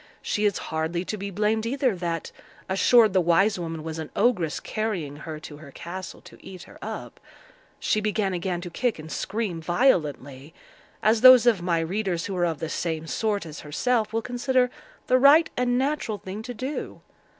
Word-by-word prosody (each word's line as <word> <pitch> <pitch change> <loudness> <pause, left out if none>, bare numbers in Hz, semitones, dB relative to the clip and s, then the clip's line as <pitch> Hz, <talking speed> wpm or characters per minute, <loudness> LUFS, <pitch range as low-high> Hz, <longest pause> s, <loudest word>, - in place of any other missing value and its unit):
She 210 - 0
is 205 -2 +2 0.2
hardly 160 +3 -1
to 215 - -3
be 200 -1 -5
blamed 210 +3 0
either 255 -1 0
that, 170 -2 -3 0.4
assured 215 +2 +4
the 185 - +4
wise 180 +4 +3
woman 165 -2 -5
was 160 0 -5
an 160 - -5
ogress 180 -10 +1
carrying 185 -10 -3
her 155 0 -7
to 150 -2 -9
her 150 -1 -12
castle 180 +6 -8
to - - -16
eat 185 -2 -10
her - - -15
up, - - -7 0.6
she 215 - +1
began 210 -2 0
again 175 0 -2
to 175 -1 -7
kick 240 +5 -1
and 155 0 -9
scream 195 -5 -3
violently, 155 - 0 0.5
as 215 +1 +3
those 255 -2 +9
of 225 -7 +4
my 170 -2 +1
readers 180 0 -2
who 195 - -4
are 175 -1 +1
of 165 -2 -2
the 160 - -4
same 160 -1 -3
sort 205 +3 -1
as 155 -2 -8
herself 215 - 0
will 225 0 -1
consider 250 0 +1 0.3
the 255 - +3
right 290 +5 +6
and 245 0 +1
natural 265 -5 -1
thing 195 +2 -7
to 245 +2 -6
do. 260 +6 -5
190 Hz, 185 wpm, -25 LUFS, 165-230 Hz, 0.6 s, those